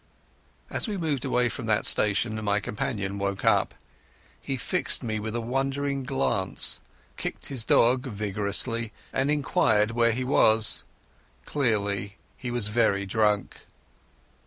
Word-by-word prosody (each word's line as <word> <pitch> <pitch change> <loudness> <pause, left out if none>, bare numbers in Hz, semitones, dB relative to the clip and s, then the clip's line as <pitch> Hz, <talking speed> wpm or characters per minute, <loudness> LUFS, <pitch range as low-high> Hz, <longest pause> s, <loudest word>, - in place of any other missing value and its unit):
As - - +1
we 210 -2 -3
moved 155 -7 -2
away 125 0 +2
from 115 -1 -5
that 105 -1 +2
station 110 +1 +2
my 105 0 +1
companion 100 -1 -3
woke 100 0 -2
up. - - +3 0.7
He 135 - -3
fixed 180 +3 0
me 110 -2 -2
with 110 +2 -4
a 120 - -1
wandering 135 +2 -2
glance, 65 - 0 0.4
kicked - - -5
his 130 -5 +1
dog 125 +4 +3
viciously, 105 +2 -1 0.2
and 135 +2 +1
inquired 115 -7 +2
where 115 0 +2
he 125 +3 -2
was. 110 -4 +3 0.6
Clearly 100 -7 -1 0.2
he 125 - -5
was 120 -3 0
very 105 -3 +1
drunk. 105 0 0
115 Hz, 135 wpm, -26 LUFS, 105-130 Hz, 0.7 s, up